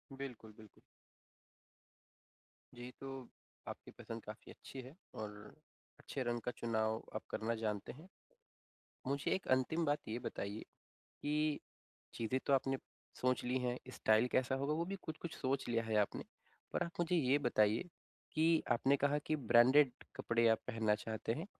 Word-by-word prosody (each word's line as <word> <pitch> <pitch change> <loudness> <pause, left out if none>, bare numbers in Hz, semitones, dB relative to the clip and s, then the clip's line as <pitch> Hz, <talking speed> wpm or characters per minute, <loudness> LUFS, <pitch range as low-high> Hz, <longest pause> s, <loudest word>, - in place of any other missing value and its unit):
बिल्कुल, 125 -5 -7
बिल्कुल। 110 -2 -15 2.0
जी, 120 +1 -7
तो 135 -2 -6 0.4
आपकी - - -7
पसंद 115 -1 -7
काफ़ी 105 0 -9
अच्छी 135 - -9
है 130 +4 -11 0.2
और 105 -1 -4 0.7
अच्छे 135 - -3
रंग 120 0 0
का 125 - -2
चुनाव 110 -1 0
आप 110 - -2
करना 115 +1 -1
जानते 105 -3 -2
हैं। 155 +7 -13 1.0
मुझे 140 +1 0
एक 190 - -3
अंतिम 130 +6 +3
बात 145 -1 +2
ये 110 +2 -1
बताइए, 100 -2 -4 0.6
कि 150 0 +1 0.5
चीज़ें 115 +3 0
तो 140 - +3
आपने 135 0 +3 0.4
सोच 125 0 +2
ली 125 +1 +1
हैं, 125 -1 0
स्टाइल 110 +1 +4
कैसा 130 +1 +2
होगा 140 +3 0
वो 165 +2 0
भी 195 - -3
कुछ-कुछ 160 +1 -5
सोच 135 0 -1
लिया 115 -1 +2
है 110 -1 -1
आपने। 105 - +1 0.5
पर - - +2
आप 170 - -5
मुझे 175 +1 +2
ये 140 -3 +4
बताइए 115 - +3 0.4
कि 160 0 +4
आपने 135 +4 +4
कहा 145 +1 +3
कि 155 - +2
ब्रांडेड 130 +1 +6 0.2
कपड़े 115 0 +3
आप 110 - +4
पहनना 110 -3 +2
चाहते 110 +1 -2
हैं, 160 +8 -4
125 Hz, 155 wpm, -37 LUFS, 115-145 Hz, 2.0 s, ब्रांडेड